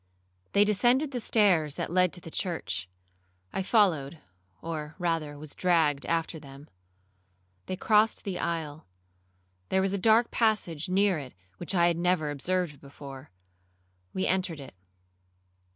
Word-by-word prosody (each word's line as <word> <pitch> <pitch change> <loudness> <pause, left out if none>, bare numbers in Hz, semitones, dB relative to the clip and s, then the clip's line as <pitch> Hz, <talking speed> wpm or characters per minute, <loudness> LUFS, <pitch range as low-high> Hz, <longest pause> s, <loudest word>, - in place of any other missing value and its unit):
They 205 +1 +5
descended 245 +7 +3
the 250 - -3
stairs 185 -10 +3
that - - -4
led 180 -1 +3
to 175 - -7
the 165 - -10
church. 95 - -3 0.6
I - - -1
followed, 175 - +2 0.4
or 155 +2 -5
rather 165 -5 -1
was 150 0 -8
dragged 160 -6 +2
after 165 -1 -1
them. 140 0 -13 1.0
They - - -2
crossed 215 +3 +2
the 190 -3 -4
aisle; 160 -2 -3 0.8
there 190 - +2
was 190 0 +1
a 200 - 0
dark 225 +4 +4
passage 195 -9 0
near 190 -2 +2
it 130 -3 -9 0.2
which 175 +3 -2
I 170 -1 +5
had 170 -1 +2
never 170 -4 +1
observed 170 +1 -2
before. 140 0 -11 0.8
We 190 - -1
entered 185 -4 0
it. 135 - -10
170 Hz, 140 wpm, -28 LUFS, 150-195 Hz, 1.0 s, They